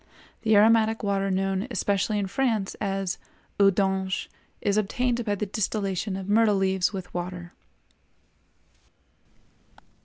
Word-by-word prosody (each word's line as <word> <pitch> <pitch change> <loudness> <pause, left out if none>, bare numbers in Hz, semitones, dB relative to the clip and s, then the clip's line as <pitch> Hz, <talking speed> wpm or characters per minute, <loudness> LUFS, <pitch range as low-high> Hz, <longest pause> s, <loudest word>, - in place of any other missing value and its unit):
The 220 -1 +3
aromatic 220 +1 +4
water 195 -1 0
known, 195 +2 0
especially 210 -2 0
in 200 - 0
France, 220 -2 0
as 195 -2 -2 0.4
"eau 200 -1 +7
d'anges" 190 0 0 0.3
is 200 -1 0
obtained 240 +3 0
by 205 -2 0
the 210 - -2
distillation 200 -1 -2
of 190 -1 -6
myrtle 215 0 +4
leaves 190 -1 +1
with 190 -3 -7
water. 175 0 -5
200 Hz, 120 wpm, -26 LUFS, 190-215 Hz, 0.4 s, eau